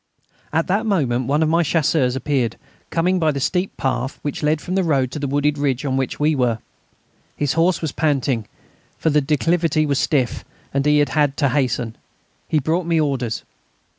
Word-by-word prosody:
At 165 +1 +1
that 205 +5 0
moment 130 - +1
one 145 +3 +2
of 155 - +1
my 165 +1 +3
Chasseurs 150 -5 +1
appeared, 130 -4 0 0.3
coming 180 +2 +1
by 160 -2 +2
the 140 - -3
steep 180 +7 -1
path 130 0 -2
which 145 - -3
led 150 0 +2
from 180 - -5
the 190 0 +2
road 135 -6 +1
to 150 - -5
the 140 - -2
wooded 145 +1 +1
ridge 140 -1 0
on 130 -2 0
which 130 -2 -2
we 150 +1 +3
were. 125 -5 +1 0.8
His 145 -2 0
horse 170 +2 +2
was 155 - -1
panting, 135 -8 0 0.5
for 160 - +1
the 150 0 +3
declivity 155 +2 +1
was 140 -2 +1
stiff, 130 -6 0 0.3
and 140 +1 +1
he 150 0 +5
had 145 0 +3
had 145 -2 +1
to 140 -3 +2
hasten. 125 -4 0 0.5
He 155 - +1
brought 165 +4 0
me 165 -1 +2
orders. 130 -6 -1
145 Hz, 195 wpm, -21 LUFS, 135-160 Hz, 0.8 s, he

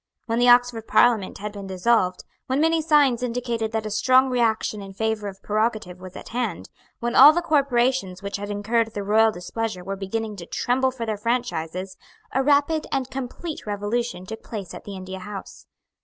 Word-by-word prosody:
When 230 0 -1
the 245 0 +5
Oxford 245 -2 +4
Parliament 225 -6 +3
had 210 +1 -5
been 200 -1 -8
dissolved, 185 -1 +1 0.2
when 260 +2 0
many 325 +1 +3
signs 290 -6 +3
indicated 235 -2 -2
that 220 -1 -2
a 215 - -4
strong 260 +4 +4
reaction 220 -3 0
in 195 -1 -9
favour 220 -1 -1
of 195 -1 -9
prerogative 215 -4 -1
was 185 -1 -10
at - - -9
hand, 235 -7 -3 0.3
when 240 +1 -1
all 290 +4 +10
the 345 - +1
corporations 255 - +1
which 200 0 -3
had 205 0 -6
incurred 220 +2 0
the 205 - -3
royal 220 +2 +4
displeasure 205 +1 -4
were 195 +2 -4
beginning 210 +2 -4
to 170 -2 -9
tremble 260 +2 +1
for 255 -3 -5
their 215 -2 -2
franchises, 195 -6 -2 0.3
a 265 - +1
rapid 290 +3 +2
and 265 -1 -1
complete 270 +3 -6
revolution 205 -1 -2
took 220 +3 -7
place 200 -6 -7
at - - -10
the 200 - -7
India 190 0 -7
House. 195 +1 -9
225 Hz, 185 wpm, -24 LUFS, 200-250 Hz, 0.3 s, all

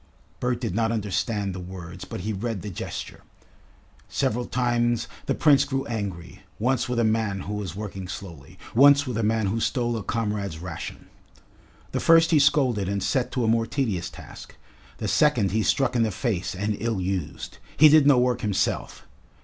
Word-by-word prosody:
Bert 125 -1 -1
did 115 -7 -3
not 110 +2 +1
understand 100 -1 -1
the 95 - -6
words, 90 -1 -8
but - - -6
he 110 +4 -3
read 105 0 -4
the 105 - -5
gesture. 85 - -6 0.9
Several 120 +3 -1
times 120 -2 0 0.2
the - - +1
Prince 140 -3 +5
grew 135 -1 -2
angry; 95 -5 -5 0.2
once 125 +2 0
with 125 - -1
a 120 - +3
man 110 -3 0
who 105 - -5
was 100 -5 -4
working 95 -2 -6
slowly, 85 -6 -9 0.2
once 140 +3 +6
with 125 -3 -4
a 115 - 0
man 110 0 +1
who 105 +4 -1
stole 120 +1 0
a 110 - -3
comrade's 105 -5 -2
ration. 85 -1 -7 0.9
The - - -1
first 165 0 +5
he 155 - +5
scolded 130 -9 +2
and 100 -1 -1
set 120 +6 0
to 125 - 0
a - - +1
more 115 0 +2
tedious 110 - -2
task; - - -12 0.4
the - - -3
second 125 -10 +3
he 110 +2 +1
struck 130 +3 +1
in 120 - +3
the 110 - +2
face 95 -3 -2
and 105 +3 -1
ill 115 -3 -1
used. 95 -3 -4 0.2
He 155 - +9
did 150 -1 +6
no 145 -3 +6
work 125 -1 +2
himself. 105 -3 -1
110 Hz, 185 wpm, -25 LUFS, 95-125 Hz, 0.9 s, He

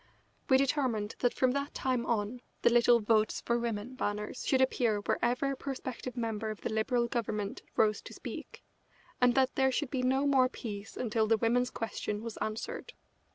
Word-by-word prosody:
We 260 - +7
determined 255 -6 0
that 245 - +3
from 255 -1 +3
that 280 +2 -3
time 255 -2 0
on 230 +2 -1 0.2
the - - +6
little 240 0 +6
"Votes 215 0 +2
For 235 0 0
Women" 230 +1 -3
banners 210 -1 -3
should 265 - +3
appear 245 -4 +2
wherever 245 +6 0
a - - -2
prospective 255 -2 -5
member 225 -2 -2
of 215 - -6
the 225 - -3
Liberal 235 +2 +1
Government 210 -4 -2
rose 215 -1 +3
to - - -10
speak, - - -8 0.6
and 245 -1 +5
that 265 -1 +3
there 265 -1 +3
should 265 +1 -1
be 260 - 0
no 265 +2 +2
more 265 -3 +4
peace 210 -4 -7
until 220 -2 +1
the 225 0 +4
women's 245 +3 +2
question 215 -1 -4
was 230 -2 -6
answered. 220 - -4
240 Hz, 180 wpm, -31 LUFS, 220-260 Hz, 0.6 s, We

